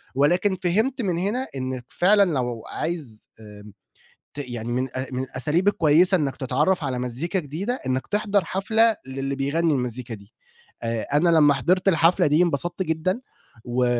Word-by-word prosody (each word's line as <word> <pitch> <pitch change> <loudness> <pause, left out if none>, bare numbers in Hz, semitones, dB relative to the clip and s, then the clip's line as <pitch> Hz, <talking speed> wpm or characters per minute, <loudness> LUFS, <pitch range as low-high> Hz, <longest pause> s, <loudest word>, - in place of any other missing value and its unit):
ولكن 175 +8 +2
فهمت 220 +9 +1
من 180 -6 -1
هنا 220 +9 -1
إنك 130 -1 -4
فعلًا 200 +3 +4
لو 120 -4 -2
عايز 145 -11 -5
آآ، 105 -2 -12 0.7
ت - - -12
يعني 120 -4 -5
من 130 +2 -1
أ 130 +1 -2
من 130 +1 -2
الأساليب 150 +9 0
الكويّسة 180 +1 +4
إنك 140 -5 -2
تتعرف 150 +6 0
على 130 -2 -2
مزيكا 125 +10 -2
جديدة 180 - -4
إنك 130 0 -1
تحضر 205 -2 0
حفلة 220 +5 +2
للي 135 +1 -3
بيغني 155 +4 +1
المزيكا 125 -2 -4
دي، 100 +1 -15 0.5
آآ، 115 -1 -1
أنا 165 +4 +3
لمّا 150 -3 +5
حِضرت 180 +8 +1
الحفلة 175 0 +4
دي 150 +4 +4
انبسطت 175 +3 -1
جدًا، 170 +7 -1 0.4
و 125 +1 0
150 Hz, 160 wpm, -23 LUFS, 130-185 Hz, 0.7 s, لمّا